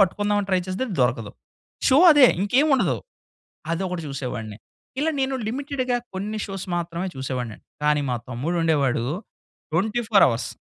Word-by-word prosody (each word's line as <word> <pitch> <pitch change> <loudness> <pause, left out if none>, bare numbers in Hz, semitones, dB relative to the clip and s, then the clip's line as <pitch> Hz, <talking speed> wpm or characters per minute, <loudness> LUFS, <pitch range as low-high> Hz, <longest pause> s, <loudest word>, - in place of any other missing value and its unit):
పట్టుకుందాం 205 +2 +2
అని 195 - -8
ట్రై 185 -1 +3
చేస్తేది 185 +8 -2
అది 195 - -4
దొరకదు. 115 -4 -1 0.6
షో 265 +1 +6
అదే 285 -3 +8
ఇంకేమి 255 +10 +3
ఉండదు. - - +1 0.8
అదొకటి 180 0 -3
చూసేవాడిని. 125 -6 -5 0.4
ఇలా 320 +2 +2
నేను 265 0 0
లిమిటెడ్‌గా 255 0 -1 0.2
కొన్ని 210 +3 -3
షోస్ 195 -2 -5
మాత్రమే 170 +2 -3
చూసేవాడినండి 125 -4 -5 0.2
కానీ 150 0 +3
మా 125 - +1
తమ్ముడు 140 +9 -2
ఉండేవాడు 140 -7 +1 0.7
24. 210 - +2
185 Hz, 135 wpm, -24 LUFS, 135-220 Hz, 0.8 s, అదే